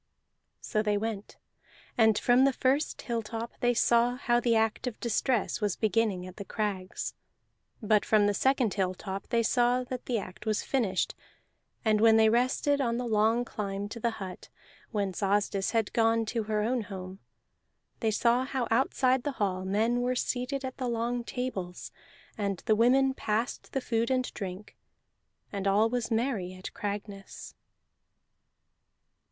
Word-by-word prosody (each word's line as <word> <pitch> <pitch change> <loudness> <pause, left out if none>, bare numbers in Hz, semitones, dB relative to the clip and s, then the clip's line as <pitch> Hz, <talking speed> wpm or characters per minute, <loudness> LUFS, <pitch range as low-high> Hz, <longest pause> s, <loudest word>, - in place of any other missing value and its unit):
So 215 - 0
they 210 -1 +1
went, 215 -1 -4 0.6
and 220 -2 +4
from 245 +3 +4
the 275 0 +4
first 270 +5 0
hilltop 230 0 -4
they 245 0 +2
saw 235 +1 +3
how 240 -2 +1
the 235 -1 +2
act 225 +3 +1
of 240 - -5
distress 235 0 0
was 205 -3 0
beginning 215 -3 0
at 185 0 -11
the 200 - -5
crags; 195 -2 -3 0.7
but 210 0 +3
from 215 -2 +3
the 205 - +2
second 260 -1 +2
hilltop 190 0 -3
they 235 -1 +1
saw 245 +2 +2
that 250 0 -6
the 245 - +1
act 195 +1 -7
was 215 -1 +1
finished. 215 -9 0 0.7
And 215 -1 +3
when 225 0 +6
they 220 0 +6
rested 255 +4 +2
on 235 -3 0
the 250 - -2
long 225 +2 +2
climb 200 -3 -4
to 235 - -7
the 235 - +1
hut, 190 -3 -8 0.4
whence 200 -4 -2
Asdis 200 0 +1
had 225 -3 0
gone 225 0 +3
to 225 0 -2
her 210 0 0
own 220 - 0
old 225 - -3
home, 190 -1 -8 0.8
they 225 - +1
saw 235 +3 +2
how 260 -2 -2
outside 255 +1 +2
the 285 +2 -3
hall 190 -5 -1
men 225 +5 +1
were 250 +1 0
seated 255 +2 -2
at 260 - -6
the 255 - -2
long 235 +1 -1
tables, 205 -9 -5 0.5
and 200 -3 -2
the 215 - +4
women 265 +4 +4
passed 225 -1 -2
the 270 - -1
food 230 -1 0
and 255 -1 0
drink, 195 0 -7 0.8
and 200 -1 -2
all 210 +3 +3
was 245 -2 -1
merry 225 -6 -1
at 185 - -8
Cragness. 200 -1 -6
225 Hz, 160 wpm, -29 LUFS, 205-245 Hz, 0.8 s, when